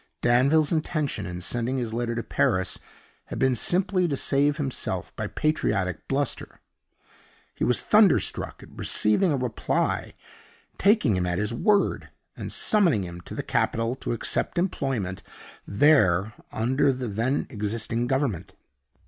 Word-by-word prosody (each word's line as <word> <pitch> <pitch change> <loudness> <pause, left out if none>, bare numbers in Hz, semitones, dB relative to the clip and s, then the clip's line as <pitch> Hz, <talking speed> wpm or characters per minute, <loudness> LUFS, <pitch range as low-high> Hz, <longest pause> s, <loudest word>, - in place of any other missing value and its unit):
Danville's 140 +6 +3
intention, 155 - -1
in 90 0 -6
sending 120 +7 -1
his 120 -3 -3
letter 120 0 -2
to 115 - -3
Paris, 95 0 0 0.5
had - - -7
been 130 -1 +2
simply 180 - +1
to 140 -4 -2
save 145 +2 +1
himself 135 -4 -3
by - - -3
patriotic 100 - -1
bluster. 140 0 -2 0.9
He - - -4
was 125 - +2
thunderstruck 210 -3 +3
at - - -14
receiving 160 - +2
a 145 - +1
reply, 125 -4 -1 0.6
taking 200 - +3
him 90 -1 0
at 90 0 -1
his 105 +3 -1
word, 205 - +1 0.3
and - - -6
summoning 175 - +3
him 85 -1 -8
to - - -9
the - - -3
capital 115 +1 0
to - - -3
accept 115 - -1
employment 135 - -2 0.5
there 105 - +3 0.2
under 130 +5 +1
the 130 -1 -4
then 115 +7 -1
existing 115 +2 -2
Government. 110 - -2
125 Hz, 140 wpm, -25 LUFS, 105-145 Hz, 0.9 s, Danville's